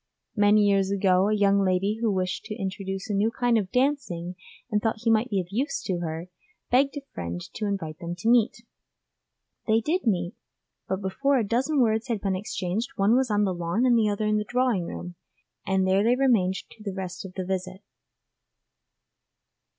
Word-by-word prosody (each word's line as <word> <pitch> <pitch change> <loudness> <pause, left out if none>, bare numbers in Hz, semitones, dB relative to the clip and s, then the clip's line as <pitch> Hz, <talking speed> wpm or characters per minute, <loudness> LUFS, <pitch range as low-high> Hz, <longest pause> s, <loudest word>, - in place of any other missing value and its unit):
Many 210 0 +5
years 195 -1 +3
ago, 190 -1 +3
a 215 - +2
young 200 -1 +3
lady 195 +3 +1
who 225 -2 +2
wished 185 -1 -2
to 215 - -5
introduce 195 -1 -4
a 210 - -2
new 205 +3 +2
kind 240 0 +1
of 200 -4 0
dancing 250 -11 0 0.4
and 210 -1 +1
thought 220 -1 -1
he 230 - +3
might 225 +3 +2
be 200 - 0
of 175 -2 -4
use 260 +9 -1
to 180 -2 -2
her, 165 0 -4 0.4
begged 275 +3 +3
a - - -4
friend 85 0 -4
to 210 - -3
invite 165 -6 -4
them 170 0 -5
to 180 +5 -5
meet. 235 0 +3 1.0
They 220 0 +4
did 310 +5 -1
meet, 175 -4 +1 0.5
but 190 +1 -2
before 275 +9 +1
a 225 -5 0
dozen 265 +7 +1
words 220 0 +1
had 230 -4 -1
been 195 -1 -1
exchanged 190 +3 -3
one 205 +2 +3
was 260 -1 +2
on 210 0 +2
the 190 -2 +1
lawn 175 +7 0
and 245 -2 +5
the 220 -2 +3
other 205 +1 -1
in 215 0 +2
the - - -1
drawing 245 -5 0
room, 175 0 -7 0.5
and 190 -1 +2
there 190 +1 +3
they 235 +3 +4
remained 230 -9 +3
to 215 - -10
the 195 -2 -5
end 185 -1 -5
of 185 - -14
the 185 - -3
visit. 185 +1 -4
205 Hz, 195 wpm, -26 LUFS, 185-230 Hz, 1.0 s, Many